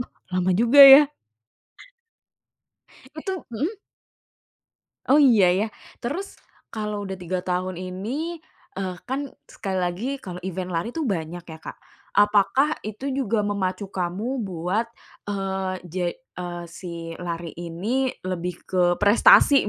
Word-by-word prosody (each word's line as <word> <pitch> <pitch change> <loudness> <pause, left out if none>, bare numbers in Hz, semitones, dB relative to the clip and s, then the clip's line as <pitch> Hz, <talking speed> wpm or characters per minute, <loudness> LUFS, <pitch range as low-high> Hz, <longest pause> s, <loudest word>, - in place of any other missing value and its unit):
Wah, 245 - -5 0.2
lama 185 0 +1
juga 240 +6 +6
ya? 275 +1 +10 2.1
Itu 370 +4 -5
nmhm. 315 - -2 1.3
Oh 290 +3 +5
iya, 215 -10 +6
ya. 205 +4 0 0.3
Terus 350 +12 -5 0.3
kalau 210 -2 -3
udah 190 -1 -5
3 180 +1 -3
tahun 185 0 -2
ini, 235 - -4 0.4
eee, 185 -2 -3
kan 275 +2 -3 0.2
sekali 190 -2 -4
lagi 180 +8 -2
kalau 180 -5 -8
event 185 0 -4
lari 170 +6 -1
tuh 320 - -1
banyak 175 -5 -3
ya 160 -2 -10
Kak. - - -8 0.4
Apakah 205 +8 +3
itu 220 +6 -5
juga 230 -6 0
memacu 195 -1 -2
kamu 200 +9 -2
buat, 190 +4 -2 0.4
eee, 190 -1 -2
jad 175 0 -2
eee, 175 -8 -8
si 170 -1 -7
lari 170 -1 -5
ini 195 +11 -1 0.2
lebih 180 -1 -3
ke 185 -1 0
prestasi 275 - +6
195 Hz, 125 wpm, -24 LUFS, 180-245 Hz, 2.1 s, ya